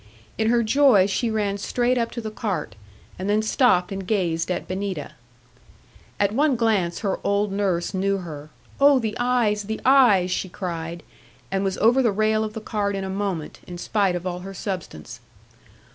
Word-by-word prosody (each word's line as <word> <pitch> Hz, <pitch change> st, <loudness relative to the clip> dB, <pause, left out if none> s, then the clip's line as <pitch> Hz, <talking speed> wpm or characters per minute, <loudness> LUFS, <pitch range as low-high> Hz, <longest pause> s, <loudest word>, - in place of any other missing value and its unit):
In 220 Hz, 0 st, +1 dB
her 235 Hz, 0 st, +3 dB
joy 235 Hz, -4 st, +5 dB
she 215 Hz, +4 st, -1 dB
ran 205 Hz, -2 st, -1 dB
straight 245 Hz, +4 st, 0 dB
up 235 Hz, -2 st, 0 dB
to 235 Hz, -, -4 dB
the 215 Hz, -1 st, -5 dB
cart; 180 Hz, -, -3 dB, 0.4 s
and 190 Hz, +2 st, -3 dB
then 210 Hz, +1 st, +2 dB
stopped 215 Hz, -5 st, +2 dB
and 195 Hz, -1 st, -5 dB
gazed 175 Hz, -6 st, 0 dB
at 180 Hz, -, -2 dB
Benita. 185 Hz, -5 st, -4 dB, 1.1 s
At 200 Hz, -1 st, +2 dB
one 280 Hz, +4 st, +2 dB
glance 210 Hz, -7 st, 0 dB
her 200 Hz, -3 st, -1 dB
old 200 Hz, 0 st, +1 dB
nurse 195 Hz, -3 st, -1 dB
knew 195 Hz, +1 st, 0 dB
her: 155 Hz, -5 st, -8 dB, 0.3 s
'Oh, 280 Hz, 0 st, +6 dB
the 220 Hz, -4 st, -2 dB
eyes, 235 Hz, -4 st, +1 dB
the 220 Hz, +1 st, -4 dB
eyes!' 240 Hz, -9 st, +5 dB
she 185 Hz, +1 st, -2 dB
cried, 170 Hz, -2 st, -5 dB, 0.5 s
and 195 Hz, 0 st, 0 dB
was 195 Hz, 0 st, -1 dB
over 240 Hz, +4 st, +4 dB
the 235 Hz, -4 st, +2 dB
rail 215 Hz, +1 st, +1 dB
of 215 Hz, -1 st, -4 dB
the 220 Hz, -, -6 dB
cart 205 Hz, -2 st, -2 dB
in 195 Hz, -, -3 dB
a 190 Hz, -, -4 dB
moment, 190 Hz, -5 st, -3 dB
in 175 Hz, -, -7 dB
spite 195 Hz, 0 st, 0 dB
of 175 Hz, 0 st, -5 dB
all 180 Hz, -1 st, -3 dB
her 195 Hz, +2 st, -8 dB
substance. 180 Hz, -, -6 dB
200 Hz, 185 wpm, -23 LUFS, 185-220 Hz, 1.1 s, Oh